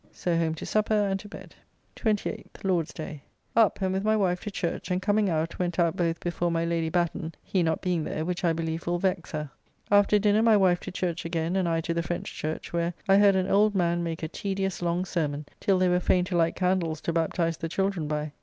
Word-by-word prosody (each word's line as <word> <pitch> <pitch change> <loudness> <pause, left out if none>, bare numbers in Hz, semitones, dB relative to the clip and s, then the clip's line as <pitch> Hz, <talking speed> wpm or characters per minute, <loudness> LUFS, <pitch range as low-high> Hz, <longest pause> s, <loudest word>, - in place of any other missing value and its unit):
So 175 -2 -1
home 165 -1 +1
to - - -7
supper 215 0 +1
and 200 -2 +1
to 205 - -11
bed. - - -11 0.4
28th 215 -3 -2
(Lord's 180 -5 +1
day). 155 -2 -7 0.3
Up 225 -2 +4
and, 190 0 +1
with 190 +1 -1
my 215 +1 +3
wife 180 -3 +1
to 210 - -4
church, 190 -3 -3
and 180 0 +1
coming 205 +1 +2
out, 165 0 -1
went 175 -2 -1
out 170 -2 +2
both 170 -1 0
before 175 0 -1
my 165 0 0
Lady 165 -1 0
Batten, 170 -1 -1
he 190 - 0
not 160 -1 0
being 180 -3 0
there, 155 +1 -3
which 180 +1 -3
I 170 - +3
believe 165 0 -3
will 175 0 +1
vex 185 -1 -1
her. 150 -2 -4 0.4
After 205 +1 +5
dinner 210 +1 +3
my 225 -2 +5
wife 180 -3 +3
to 190 - -7
church 180 -2 -2
again, 165 +1 -1
and 185 -3 +1
I 165 0 +1
to 170 - -2
the 170 - 0
French 170 +1 -4
church, 155 +2 -5
where 170 0 0
I 195 0 +6
heard 200 -1 +6
an 185 0 +1
old 205 +1 +3
man 175 -2 +1
make 165 -1 -4
a - - 0
tedious, 195 +2 -3
long 175 +1 0
sermon, 150 -5 -2
till 195 -2 +2
they 185 0 +3
were 180 0 +3
fain 180 0 +2
to 185 - -3
light 165 -1 +2
candles 180 -4 0
to 170 - -2
baptize 165 0 0
the 165 - -4
children 190 -3 -1
by. 150 0 -2
175 Hz, 240 wpm, -27 LUFS, 165-195 Hz, 0.4 s, I